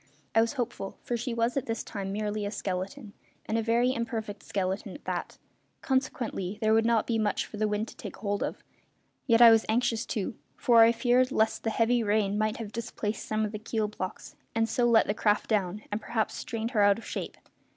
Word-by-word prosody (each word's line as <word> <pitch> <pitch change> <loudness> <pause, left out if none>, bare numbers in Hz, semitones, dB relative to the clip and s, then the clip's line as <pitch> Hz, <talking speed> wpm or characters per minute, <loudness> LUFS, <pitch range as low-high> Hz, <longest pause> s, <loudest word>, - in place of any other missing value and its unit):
I 225 - +5
was 230 +3 0
hopeful, 240 -7 -4
for 240 - -2
she 240 +2 -3
was 230 +1 0
at 275 - -1
this 225 0 -2
time 195 -2 -5
merely 210 +1 -2
a 205 - -1
skeleton, 205 +4 -4 0.3
and 220 - -2
a 230 - +2
very 235 +3 +2
imperfect 225 -4 -4
skeleton 190 0 -3
at - - -13
that; - - -4 0.4
consequently 250 - -1
there 220 -1 +3
would 225 +1 +4
not 230 -2 +3
be 225 -2 0
much 210 -1 0
for 215 - -9
the 215 0 +1
wind 210 +1 -1
to - - -12
take - - -8
hold 205 -1 -2
of; - - -3 0.6
yet 230 -1 +6
I 230 - +10
was 225 -1 +5
anxious 230 0 +1
too, 210 -1 -2 0.2
for 235 -2 +5
I 225 - +6
feared 250 +2 +2
lest 220 -2 +1
the 225 - +1
heavy 235 +2 +2
rain 205 -2 +1
might 215 0 0
have 220 -3 -6
displaced 215 -2 -4
some 215 0 0
of 210 - -4
the 215 - -5
keel 220 0 -1
blocks 185 -3 -6 0.2
and 225 0 +2
so 240 +2 +1
let 230 -2 +5
the 205 - 0
craft 210 +1 +1
down 205 0 0
and 205 +2 -2
perhaps 225 0 -1
strained 230 0 -4
her 215 -5 +2
out 200 0 +5
of 230 - -10
shape. - - -5
220 Hz, 220 wpm, -28 LUFS, 210-235 Hz, 0.6 s, I